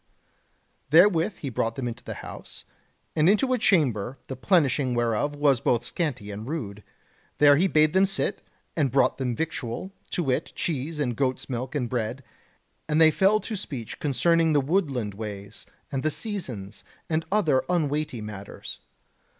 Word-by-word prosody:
Therewith 175 +4 +5
he 140 - -4
brought 115 0 -1
them 130 -2 -3
into 120 +1 -6
the - - -6
house, - - -9 0.5
and 155 +2 +4
into 255 +6 +3
a 250 - +1
chamber, 130 - +2
the 130 - -3
plenishing 140 -4 +2
whereof 120 +5 0
was 145 -4 +3
both 120 -1 +2
scanty 125 - -3
and 105 +3 -7
rude. 105 -10 -5 0.5
There 145 -1 +7
he 180 +7 +3
bade 155 -3 +3
them 190 +1 +4
sit, 195 - -2 0.3
and 145 -5 +2
brought 135 +2 +2
them 125 -3 -1
victual, 160 +1 -4 0.2
to 175 - -1
wit, 135 +2 -1
cheese 150 0 -2
and 125 -5 0
goats' 130 0 -1
milk 125 +3 -4
and 130 -4 0
bread, 120 +2 -3 0.7
and 150 +1 +2
they 160 -1 +7
fell 195 +6 +3
to 225 - -4
speech 135 - -6
concerning 165 +3 +2
the 145 - +5
woodland 135 - 0
ways, 100 -1 -8 0.2
and 135 -2 -1
the 155 - +1
seasons, 130 - -5 0.2
and 160 0 0
other 160 -11 +3
unweighty 150 -7 0
matters. 105 -2 -7
140 Hz, 160 wpm, -26 LUFS, 120-165 Hz, 0.7 s, There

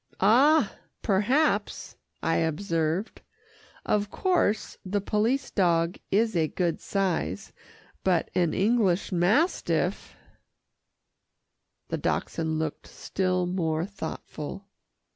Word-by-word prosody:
"Ah! 270 +11 +4 0.3
perhaps," 235 +10 +1 0.3
I 165 - +2
observed. 165 +3 -1 0.6
"Of 205 -1 +1
course 360 - 0
the 200 +1 -1
police 220 +7 0
dog 170 -3 +1
is 220 +1 +2
a 160 -2 +2
good 170 0 -1
size, 185 - -2 0.5
but 180 -3 +1
an 175 -3 +2
English 205 -3 +2
mastiff 200 - +1 0.9
" - - -54
The - - -2
Dachshund 160 -1 -1
looked 155 -1 -4
still 185 -1 -1
more 165 -3 -1
thoughtful. 190 -2 -7
190 Hz, 95 wpm, -27 LUFS, 165-210 Hz, 0.9 s, Ah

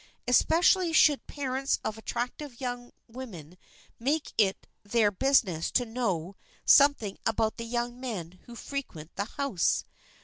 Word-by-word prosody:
Especially 335 +7 +4
should 300 -3 +4
parents 270 -1 -1
of 220 - -2
attractive 240 +4 -5
young 245 -2 -5 0.2
women 210 - -9 0.4
make 285 +6 -1
it 195 -3 +1 0.2
their 210 0 +2
business 200 - +2
to 245 - +1
know 200 -7 -2 0.3
something 280 -9 +5
about 220 0 0
the 230 - -5
young 240 +1 -3
men 185 -9 -6
who 240 - -11
frequent 225 - -7
the 200 - -2
house. 265 -6 0
240 Hz, 130 wpm, -28 LUFS, 205-270 Hz, 0.4 s, something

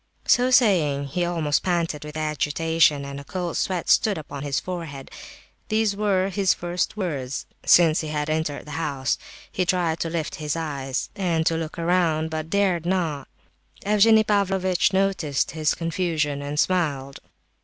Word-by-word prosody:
So 250 +1 +4
saying, 160 - +3
he 175 +6 -1
almost 165 -4 0
panted 170 -5 -1
with 150 0 -8
agitation, 155 -1 +1
and 140 0 -6
a - - -9
cold 175 +2 -4
sweat 180 -3 -1
stood 210 -3 +3
upon 145 -2 -7
his 140 -1 -1
forehead. 165 -7 -7 0.6
These 215 -1 +1
were 195 -2 +1
his 195 0 +2
first 175 +4 -2
words 140 -9 -3 0.2
since 165 -2 +6
he 155 - -5
had 150 -1 -2
entered 155 -2 -2
the 150 - -9
house; 140 -4 -1 0.3
he 185 - 0
tried 175 -3 0
to 165 - -2
lift 160 -2 -3
his 150 0 -2
eyes, 140 -5 -3
and 170 -5 0
look 165 0 -4
around, 165 -2 +1
but 160 0 -4
dared 190 -4 +1
not; 165 -7 -1 0.6
Evgenie 215 +2 +5
Pavlovitch 195 -3 +1
noticed 190 -8 0
his 155 0 0
confusion, 165 -4 -1
and 145 +1 -3
smiled. 145 -8 0
165 Hz, 155 wpm, -24 LUFS, 150-185 Hz, 0.6 s, since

